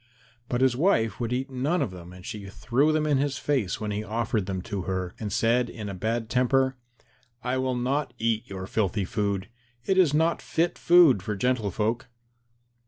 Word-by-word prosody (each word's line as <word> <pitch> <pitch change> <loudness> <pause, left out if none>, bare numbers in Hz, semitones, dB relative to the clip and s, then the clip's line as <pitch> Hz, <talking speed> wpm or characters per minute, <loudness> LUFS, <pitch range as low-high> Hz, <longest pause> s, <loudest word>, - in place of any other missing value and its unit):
But 125 0 0
his 130 -2 +4
wife 115 - +2
would 120 -1 -2
eat 130 +2 -2
none 140 +8 0
of 135 -9 -1
them 90 -1 -10
and 90 0 -12
she 100 -2 -6
threw 130 +9 +1
them 155 0 +1
in 145 -3 +2
his 140 0 0
face 130 -11 -1
when 105 -1 -3
he 105 +1 -2
offered 110 -1 -1
them 95 -2 -3
to 100 0 -4
her, 95 -1 -2
and 105 -2 -4
said 120 +3 +2
in 105 -3 -6
a - - -4
bad 110 +4 -2
temper, 130 +2 +2 0.7
"I 125 +1 0
will 130 -1 0
not 125 +1 -1
eat 115 -1 -1
your 95 -1 -5
filthy 100 -1 0
food. 100 0 -1 0.4
It 190 -1 +2
is 175 -6 +5
not 160 +3 +2
fit 170 +1 -1
food 170 - +6
for 105 +3 -3
gentle 120 0 0
folk." 110 +6 -1
115 Hz, 195 wpm, -26 LUFS, 100-135 Hz, 0.7 s, food